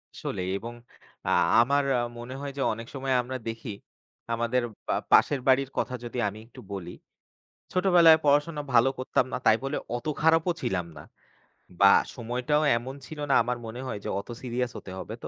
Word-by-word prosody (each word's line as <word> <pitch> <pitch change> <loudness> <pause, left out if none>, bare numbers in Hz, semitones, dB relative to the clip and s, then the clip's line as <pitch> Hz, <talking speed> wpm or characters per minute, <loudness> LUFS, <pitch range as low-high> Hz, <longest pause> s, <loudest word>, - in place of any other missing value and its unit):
আসলেই 90 0 -4
এবং 115 +4 -7 0.5
আ - - +2 0.3
আমার 140 +4 +2 0.2
আ - - +1 0.2
মনে 120 +2 -7
হয় 140 0 -4
যে - - -2
অনেক 115 +1 -8
সময় 135 -1 -1
আমরা 130 +2 -5
দেখি 115 +1 -5 0.6
আমাদের 120 +2 0 0.3
পা - - +1 0.2
পাশের 140 -3 +5
বাড়ির 135 0 +4
কথা 130 - -1
যদি 120 +1 -6
আমি 105 +1 -6
একটু 120 - -13
বলি। 90 -3 -6 0.8
ছোটবেলায় 175 -3 +6
পড়াশোনা 145 +2 +2
ভালো 120 +2 +6
করতাম 130 0 +1
না - - -1
তাই 110 - +6
বলে 135 +2 -2 0.2
অত 120 - -6 0.2
খারাপও 160 +2 +4
ছিলাম 90 -2 -1
না। 75 - -9 0.8
বা 100 0 +8 0.2
সময়টাও 125 +5 0
এমন 130 +3 -6
ছিল 155 - -9
না - - +4
আমার 125 +1 -2
মনে 115 +3 -7
হয় 105 - -4
যে - - -2
অত 100 - -10
সিরিয়াস 125 -1 -2
হতে 95 - -9
হবে 110 - -7
তো, - - -4
125 Hz, 180 wpm, -27 LUFS, 115-140 Hz, 0.8 s, বা